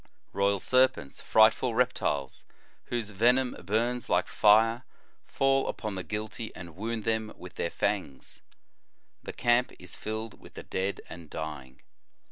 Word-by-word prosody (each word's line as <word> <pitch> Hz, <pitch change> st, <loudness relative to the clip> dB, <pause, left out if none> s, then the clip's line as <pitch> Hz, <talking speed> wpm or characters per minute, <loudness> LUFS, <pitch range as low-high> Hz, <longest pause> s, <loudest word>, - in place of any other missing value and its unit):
Royal 100 Hz, +1 st, +2 dB
serpents, 130 Hz, -, +1 dB
frightful 110 Hz, +2 st, +4 dB
reptiles 115 Hz, -, 0 dB, 0.4 s
whose 115 Hz, -3 st, -3 dB
ve 115 Hz, +5 st, +4 dB
nom 130 Hz, -1 st, -1 dB
burns 120 Hz, +4 st, -1 dB
like 90 Hz, +1 st, +2 dB
fire, 115 Hz, +3 st, +4 dB, 0.4 s
fall 135 Hz, 0 st, +2 dB
upon 110 Hz, -2 st, -4 dB
the 95 Hz, -, -4 dB
guilty 110 Hz, +2 st, -5 dB
and 85 Hz, -3 st, -10 dB
wound 110 Hz, +3 st, -3 dB
them 110 Hz, -1 st, -1 dB
with 90 Hz, 0 st, -10 dB
their 85 Hz, -, -2 dB
fangs. 95 Hz, -12 st, -3 dB, 0.8 s
The -, -, -6 dB
camp 120 Hz, +1 st, +2 dB
is 90 Hz, -1 st, -11 dB
tilled 110 Hz, +1 st, -5 dB
with -, -, -15 dB
the -, -, -7 dB
dead 95 Hz, +1 st, -2 dB
and 85 Hz, -3 st, -10 dB
dying. 70 Hz, -4 st, -7 dB
110 Hz, 140 wpm, -29 LUFS, 90-120 Hz, 0.8 s, frightful